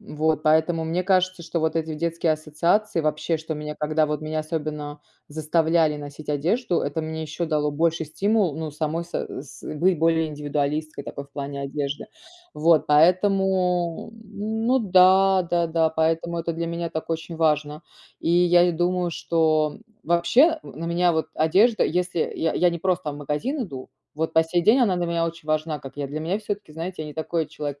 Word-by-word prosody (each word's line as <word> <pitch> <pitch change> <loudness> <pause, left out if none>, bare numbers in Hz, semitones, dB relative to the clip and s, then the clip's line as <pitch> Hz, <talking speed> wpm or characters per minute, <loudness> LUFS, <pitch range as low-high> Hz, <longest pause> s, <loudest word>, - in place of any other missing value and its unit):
Вот 155 0 -1
поэтому 160 +1 +2
мне 170 +3 -1
кажется, 185 -1 +1
что 165 0 -3
вот 160 0 0
эти 160 -1 -2
детские 165 0 0
ассоциации, 165 +6 0
вообще 155 +1 0
что 160 0 -5
меня 150 0 -5
когда 155 0 +1
вот 150 0 -2
меня 155 0 -3
особенно 150 -2 -5 0.3
заставляли 160 0 +1
носить 145 +1 -9
одежду, 170 - 0
это 145 +3 -2
мне 160 0 -4
ещё 160 +2 -4
дало 150 -2 0
больший 160 +1 0
стимул, 195 +1 +1
ну, 160 -1 -4
самой 155 +3 -2
са 175 - -4
э, - - -6
с 140 - -13
быть 175 +1 +2
более 160 0 +2
индивидуалисткой 150 0 -3
такой 140 0 -7
в - - -26
плане 140 0 -5
одежды. 140 +1 -3 0.5
Вот 160 +1 +3
поэтому, 180 +3 +2
ну 220 +4 -1
да, 190 -2 +5
да-да, 165 -2 +2
поэтому 165 +1 0
это 170 0 -2
для 170 +1 -3
меня 170 0 -3
так 160 +1 -5
очень 165 +1 -4
важно. 150 -1 0 0.4
И 165 - -1
я 175 0 +5
и - - +3
думаю, 175 +1 0
что 155 -2 +1 0.3
вообще 250 - +3
в - - -12
на 165 - -5
меня 175 +1 +2 0.2
одежда, 195 +9 +3
если 180 0 -1 0.2
я 160 - 0
я 180 -1 +3
не 170 - -4
просто 175 -3 -1
в - - -8
магазин 150 - -2
иду, 135 -9 -9 0.3
вот 160 +1 -2
по 160 - +5
сей 170 +1 0
день 230 +8 +5
она 200 -7 +3
для 175 -1 -1
меня 170 0 0
очень 165 -1 -8
важна, 155 0 -1
как 135 0 -11
я 140 -1 -3
Для 150 +2 -4
меня 175 +6 -1
всё-таки, 205 -6 -5
знаете, 165 +1 -5
я 150 - -7
не 150 - -10
такой 160 0 -2
человек, 145 -2 -6
160 Hz, 185 wpm, -24 LUFS, 155-175 Hz, 0.5 s, да